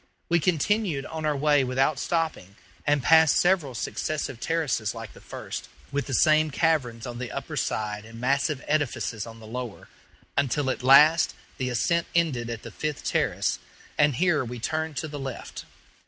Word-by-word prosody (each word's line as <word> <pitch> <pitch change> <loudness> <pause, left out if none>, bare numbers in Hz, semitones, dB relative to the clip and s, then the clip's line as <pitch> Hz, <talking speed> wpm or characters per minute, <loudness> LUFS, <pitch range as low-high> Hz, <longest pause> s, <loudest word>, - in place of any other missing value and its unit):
We 170 0 +4
continued 175 -2 +1
on 160 -1 -4
our 150 -2 +1
way 145 -1 +3
without 135 +3 +1
stopping, 160 - -2 0.3
and 145 -2 +2
passed 160 +1 +6
several 175 -8 +2
successive 135 +1 -3
terraces 140 -10 -1
like - - -8
the - - -15
first, - - -7 0.2
with 140 0 -2
the 135 - -1
same 155 +1 +4
caverns 135 -7 0
on 120 -1 -6
the 125 -1 -5
upper - - -5
side 105 -1 -2
and 115 +1 -11
massive 140 +3 0
edifices 125 -7 -1
on 115 0 -11
the 110 - -12
lower, 120 -1 -6 0.5
until 140 0 +1
at - - -5
last 150 +6 +6 0.2
the 130 -1 -1
ascent 170 +8 +1
ended 140 -9 +1
at 115 -1 -5
the - - -8
fifth 150 -2 -4
terrace, - - 0 0.4
and 145 -2 +3
here 165 -1 +2
we 125 0 -6
turned 155 +4 -2
to 160 - -2
the 145 -1 -7
left. 135 -3 -6
140 Hz, 170 wpm, -26 LUFS, 125-155 Hz, 0.5 s, passed